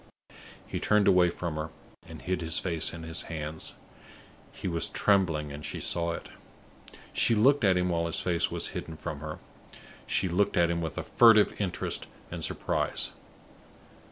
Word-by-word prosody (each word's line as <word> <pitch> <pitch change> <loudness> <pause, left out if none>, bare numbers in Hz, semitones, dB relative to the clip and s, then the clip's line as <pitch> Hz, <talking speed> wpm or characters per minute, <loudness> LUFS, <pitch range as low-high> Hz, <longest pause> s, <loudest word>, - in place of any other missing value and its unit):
He - - -4
turned 105 -1 +3
away 90 -1 +5
from 85 -3 -4
her, 80 +1 -3 0.4
and - - -10
hid 90 -1 -1
his 80 0 -1
face 85 -4 +1
in 80 -1 -8
his 80 0 -3
hands; 80 -1 -5 0.8
he - - -6
was 85 -2 0
trembling, 85 -7 +2
and 75 +1 -8
she - - -4
saw 85 -1 0
it. - - -7 0.8
She 115 - +3
looked 135 +5 +4
at 95 -3 +4
him 90 0 +1
while 85 -1 0
his 80 - -2
face 85 -2 +1
was - - -2
hidden 80 -1 -6
from 75 - -5
her; 75 +1 -6 0.7
she - - +1
looked 90 +3 +1
at 85 -1 +4
him 85 0 -1
with 80 -3 -4
a - - -2
furtive 110 -3 +6
interest 95 -3 -2 0.2
and - - -5
surprise. - - 0
85 Hz, 170 wpm, -29 LUFS, 80-95 Hz, 0.8 s, furtive